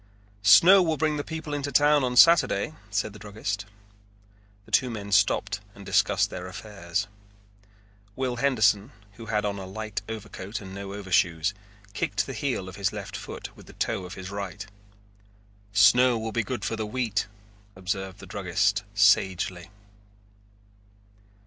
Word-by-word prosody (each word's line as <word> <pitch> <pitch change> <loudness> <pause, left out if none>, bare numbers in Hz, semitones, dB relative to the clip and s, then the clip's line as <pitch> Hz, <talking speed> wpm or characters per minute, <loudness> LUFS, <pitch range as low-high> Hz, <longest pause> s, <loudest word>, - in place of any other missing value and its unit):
"Snow 165 - +8
will 160 -3 +1
bring 155 0 0
the 145 - -2
people 160 -1 -6
into 140 -1 -3
town 145 +1 +4
on 125 -1 -1
Saturday," 165 +2 +5 0.2
said 100 +1 -2
the 105 - -12
druggist. 100 -1 -4 1.0
The - - -18
two 130 - +3
men 100 -3 -6
stopped 100 0 +2 0.2
and 100 - -12
discussed 100 +1 +2
their 90 0 -6
affairs. 100 -2 -4 1.1
Will 130 -2 -2
Henderson, 110 -4 +2 0.3
who 115 -1 -10
had 105 -1 0
on 100 -1 -2
a 95 - -7
light 110 +2 -5
overcoat 105 -2 -6
and 95 -2 -10
no 100 0 -6
overshoes, 90 -2 +1 0.4
kicked 100 +1 -1
the 135 - -6
heel 120 -5 -2
of 95 - -9
his 100 -1 0
left - - -7
foot - - -8
with - - -16
the - - -13
toe 95 - -2
of 90 +1 -8
the 95 - -8
right. 100 0 -6 1.1
"Snow 120 +5 +5
will 110 0 -4
be 115 - 0
good 115 -2 -4
for 115 - -1
the 110 -1 -3
wheat," 110 -4 -1 0.5
observed 95 +1 -4
the - - -11
druggist 95 0 0
sagely. 95 -3 +2
105 Hz, 155 wpm, -26 LUFS, 95-120 Hz, 1.1 s, Snow